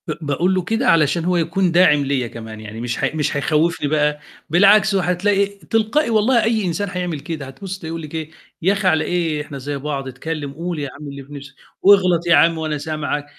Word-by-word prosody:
ب - - -2
باقُول 160 +5 0
له 185 - +1
كده 225 +7 -1
علشان 165 - +3
هو 180 0 +1
يكون 170 +2 +1
داعم 165 -5 +4
ليّا 135 -3 -1
كمان 110 -1 -9
يعني 110 +1 -8
مش 120 0 -3
ه - - +1
مش 150 -2 -1
هيخوّفني 155 +2 +1
بقى، 150 0 +1 0.3
بالعكس 195 +4 +5
هتلاقي 195 +2 +2
تلقائي 215 - -1
والله 230 +2 +3
أي 220 -2 +1
إنسان 185 +3 -2
هيعمل 180 -4 -3
كده، 150 -1 -6
هتبُص 190 +8 -7
تلاقيه 165 - -8
يقُول 165 0 -5
لِك 155 0 -8
إيه؟ 160 -1 -5 0.3
يا 190 +4 +3
أخي 200 -1 -1
على 160 -3 +3
إيه 165 -4 -1
إحنا 150 -1 -8
زي 140 +2 -4
بعض 140 -1 -4
اتكلم 145 +2 -5
قُل 170 +2 -4
يا 140 -2 -4
عم 150 - -8
اللي 140 0 -8
في 140 +2 -14
نِفْسك، 140 -1 -10 0.3
واغلط 180 -4 +4
يا 170 - +6
عم 165 -1 +4
وأنا 155 -1 -2
سامعك، 150 -1 -3
165 Hz, 215 wpm, -20 LUFS, 145-185 Hz, 0.3 s, يا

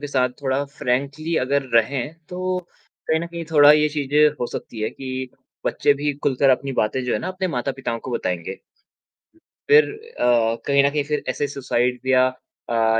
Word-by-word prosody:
के 145 - -4
साथ 130 -3 +1
थोड़ा 135 +1 0
फ्रैंकली 140 +6 -2
अगर 140 +2 +1
रहें, 130 +6 +1
तो 185 0 -2 0.5
कहीं 160 0 +2
न 170 - -4
कहीं 170 -1 -6
थोड़ा 150 -1 +8
ये 150 0 +3
चीज़ 145 -2 -3
भी 150 +1 +5 0.2
हो 120 - 0
सकती 110 - -8
है 110 - -1
कि 130 -1 -7 0.5
बच्चे 145 - +2
भी 145 +1 -1
खुलकर 135 0 +3
अपनी 135 -1 -5
बातें 125 +5 -1
जो 125 - -1
है - - +1
ना - - -4
अपने 185 0 -2
माता-पिताओं 130 -2 -3
को - - -7
बताएँगे। 90 -4 -3 1.1
फ़िर 450 +1 +7 0.3
अ, 115 -2 +3
कहीं 140 0 +4
न 140 - +4
कहीं 145 0 -1
फिर 150 +1 -2
ऐसे 145 - -1
सुसाइड 125 -2 -1
या 130 0 +5 0.4
अ, 115 -1 +2
140 Hz, 185 wpm, -22 LUFS, 125-150 Hz, 1.1 s, थोड़ा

